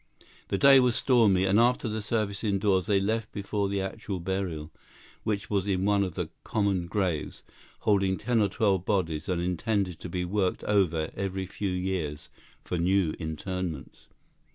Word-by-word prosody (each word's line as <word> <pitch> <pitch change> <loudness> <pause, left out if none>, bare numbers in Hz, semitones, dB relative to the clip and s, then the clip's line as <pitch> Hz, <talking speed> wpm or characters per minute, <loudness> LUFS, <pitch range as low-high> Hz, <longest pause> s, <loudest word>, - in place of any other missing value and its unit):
The 100 - -1
day 135 +4 +8
was 125 -3 +3
stormy, 110 -8 +4
and 95 +3 +3
after 120 +1 +3
the 110 0 -2
service 105 -1 -1
indoors 100 -2 +1
they 100 -3 +3
left 110 +2 -1
before 100 0 -2
the 100 0 -1
actual 95 0 -4
burial, 85 -4 -3 0.5
which 105 0 -2
was 100 -2 0
in 95 -1 0
one 100 -1 +3
of 90 -4 -4
the - - -3
"common 100 -5 0
graves," 90 -5 -2 0.4
holding 95 -2 +2
ten 120 -3 +1
or 100 - +2
twelve 95 -3 +1
bodies 90 -4 -1
and 90 -2 0
intended 90 +1 -1
to 90 - -7
be 90 +1 -2
worked 95 0 -1
over 85 -6 +1
every 95 0 -3
few 100 +2 -4
years 90 -5 -3 0.3
for 90 - -3
new 90 -1 +2
interments. 80 -1 -5
95 Hz, 165 wpm, -28 LUFS, 90-105 Hz, 0.5 s, day